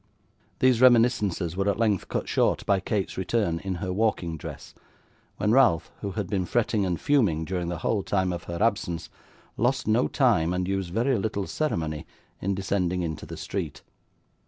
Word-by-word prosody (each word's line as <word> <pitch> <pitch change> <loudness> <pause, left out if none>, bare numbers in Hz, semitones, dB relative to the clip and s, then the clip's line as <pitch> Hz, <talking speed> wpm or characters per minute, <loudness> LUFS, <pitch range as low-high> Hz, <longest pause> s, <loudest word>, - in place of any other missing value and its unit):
These 130 -2 +3
reminiscences 115 -8 +4
were 100 +1 +1
at 100 - 0
length 110 -4 +1
cut - - -3
short - - +1
by 100 -1 +3
Kate's 95 -1 -2
return 95 -3 0
in 95 0 -3
her 90 +1 -3
walking 95 -5 0
dress, 75 - -9 0.6
when 105 - +1
Ralph, 120 - +4
who 100 -2 -4
had 105 -1 -2
been 95 -2 -1
fretting 110 -3 +1
and 90 -3 -1
fuming 100 - +2
during 90 -1 -2
the 85 - -3
whole 100 +5 0
time 95 -2 0
of 85 -2 -6
her 85 - -4
absence, 95 -7 -1 0.5
lost 130 +4 +1
no 110 +4 +3
time, 100 - +2
and 90 0 -1
used 95 -2 -1
very 120 +4 +1
little 100 -1 -2
ceremony, 80 - -2 0.3
in 100 +1 0
descending 90 -2 -1
into 80 -2 -5
the - - -7
street. - - -5
95 Hz, 175 wpm, -26 LUFS, 90-115 Hz, 0.6 s, reminiscences